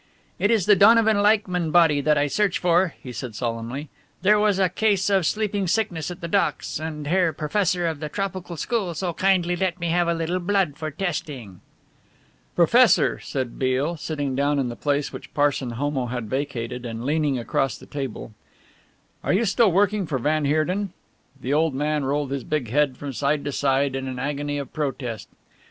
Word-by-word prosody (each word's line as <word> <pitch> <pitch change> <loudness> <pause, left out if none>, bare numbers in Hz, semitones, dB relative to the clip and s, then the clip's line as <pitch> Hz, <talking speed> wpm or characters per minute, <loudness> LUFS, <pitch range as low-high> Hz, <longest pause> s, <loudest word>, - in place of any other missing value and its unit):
"It 205 - +2
is 220 -6 +2
the 205 - +6
Donovan 220 +1 +5
Leichmann 200 -5 +2
body 160 -3 +4
that 150 +2 +2
I 145 - +3
search 190 +7 +1
for," 175 0 +2
he 125 - -7
said 120 -2 -6
solemnly; 120 +5 -4 0.4
"there 210 +2 +5
was 210 -2 +2
a 190 -1 +3
case 205 0 +1
of 190 -5 +3
sleeping 205 -3 -1
sickness 175 -5 -1
at 180 - -8
the 170 - -4
docks, 150 -3 0
and 155 -1 -5
the - - -4
Herr 180 -2 +3
Professor 175 +3 0
of 160 -3 -2
the 150 0 -4
Tropical 185 -2 -4
School 190 -1 -2
so 175 +1 -2
kindly 180 -1 +2
let 180 0 -1
me 170 0 -2
have 175 +1 +2
a 170 - +1
little 165 +2 -1
blood 185 -5 0
for 155 0 -4
testing." 150 - -5 0.9
"Professor," - - +4
said 130 -3 -4
Beale, 135 +5 0
sitting 145 -4 -3
down 145 +2 +1
in 130 -3 0
the 120 - -6
place 145 +1 -1
which - - -9
Parson 145 -3 +1
Homo 130 +1 -2
had 120 -2 -4
vacated 125 -1 -3
and 115 0 -5
leaning 150 -2 +1
across 130 +2 -1
the - - -14
table, 135 -6 -6 0.9
"are - - +1
you 215 +5 +2
still 215 +1 +3
working 200 +1 +2
for 140 - -1
van 150 +4 0
Heerden?" 175 +7 0 0.5
The 130 +2 -2
old 155 -1 +2
man 150 0 0
rolled 140 0 -1
his 140 -2 -3
big 140 -6 -2
head 145 -2 +2
from 140 -2 -6
side 140 +3 0
to 145 - -2
side 135 0 +1
in 135 0 -3
an 130 -1 -5
agony 145 +2 -2
of 140 -2 -6
protest. 135 -7 -4
150 Hz, 190 wpm, -24 LUFS, 135-180 Hz, 0.9 s, the